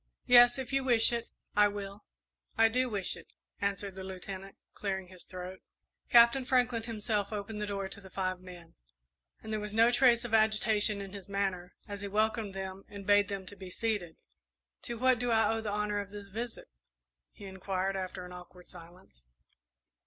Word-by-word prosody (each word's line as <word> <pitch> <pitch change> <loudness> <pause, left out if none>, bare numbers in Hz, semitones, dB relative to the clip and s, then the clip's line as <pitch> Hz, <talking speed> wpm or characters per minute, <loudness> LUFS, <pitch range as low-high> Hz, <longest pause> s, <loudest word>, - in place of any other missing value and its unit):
"Yes; 245 0 +8
if 265 0 -5
you 270 0 +2
wish 240 -2 +4
it, 235 -1 -2 0.3
I 210 0 +6
will." 200 0 -7 0.5
"I 225 0 +6
do 250 +2 +1
wish 200 -4 -1
it," - - -12 0.3
answered 200 0 -2
the 190 0 -8
Lieutenant, 190 +1 -7 0.2
clearing 190 -3 -3
his 185 -2 -11
throat. 185 0 -8 0.5
Captain 235 +2 +7
Franklin 250 -3 +2
himself 215 -2 -2
opened 210 0 -4
the 210 - -2
door 200 -1 -3
to 200 - -9
the 190 - -13
five 185 -1 -2
men, 175 -2 -12 0.7
and 220 - -5
there 215 - 0
was 210 0 -5
no 230 +2 +6
trace 240 -1 +4
of 230 - -6
agitation 215 -1 +3
in 195 0 -8
his 200 -1 -9
manner 190 -3 -2
as 200 -1 -6
he 200 - -4
welcomed 215 0 0
them 190 0 -6
and 200 -1 -9
bade 205 0 +5
them 195 -2 -5
be 190 -1 -8
seated. 200 -5 -2 0.7
"To 235 - -5
what 255 0 +3
do 245 0 -1
I 225 -1 +3
owe 225 - -2
the 220 - -4
honour 210 0 -1
of 200 -1 -5
this 205 -1 -9
visit?" 230 +3 -6 0.6
he 205 - -12
inquired, 190 0 -2
after 185 -1 -4
an 180 - -10
awkward 180 0 -12
silence. 170 - -15
205 Hz, 185 wpm, -31 LUFS, 190-225 Hz, 0.7 s, Yes